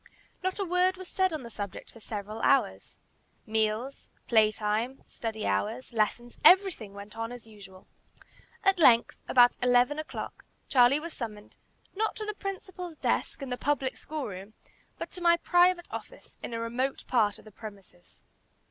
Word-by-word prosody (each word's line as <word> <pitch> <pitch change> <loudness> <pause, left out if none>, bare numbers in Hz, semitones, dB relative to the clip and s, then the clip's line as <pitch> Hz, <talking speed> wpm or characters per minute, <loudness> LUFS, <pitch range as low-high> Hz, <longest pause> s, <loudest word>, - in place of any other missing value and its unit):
Not 375 0 -1
a 395 - -1
word 360 +1 +2
was 370 -1 -9
said 375 0 +1
on 310 -4 -4
the 235 - -9
subject 200 -2 -7
for 230 - -15
several 215 0 -6
hours. 100 - +1 0.5
Meals, 220 +4 -1 0.2
play 220 -2 +5
time, 215 +5 -2
study 220 -2 -5
hours, 100 - -1
lessons, 235 +2 -1
everything 360 - +5
went 205 +2 -10
on 225 +1 -4
as 245 -2 -9
usual. 200 -4 -14 0.8
At 390 -1 +3
length, 240 -7 +5
about 245 -1 +5
eleven 250 +4 +3
o'clock, 310 - -6 0.2
Charlie 255 +2 +5
was 330 +1 -7
summoned, 210 -4 -7 0.4
not 435 +2 0
to 430 - -5
the 425 - -3
principal's 375 -4 -6
desk, 290 - -1
in 270 - -5
the 250 - -1
public 275 -1 0
school 305 -3 -5
room, 195 +2 -8 0.4
but - - -6
to 360 - -8
my 340 0 +5
private 355 0 +3
office, - - -9
in - - -6
a - - -2
remote 245 +4 -2
part 215 -5 +2
of - - -16
the 215 - -13
premises. 195 -4 -13
245 Hz, 165 wpm, -29 LUFS, 215-340 Hz, 0.8 s, play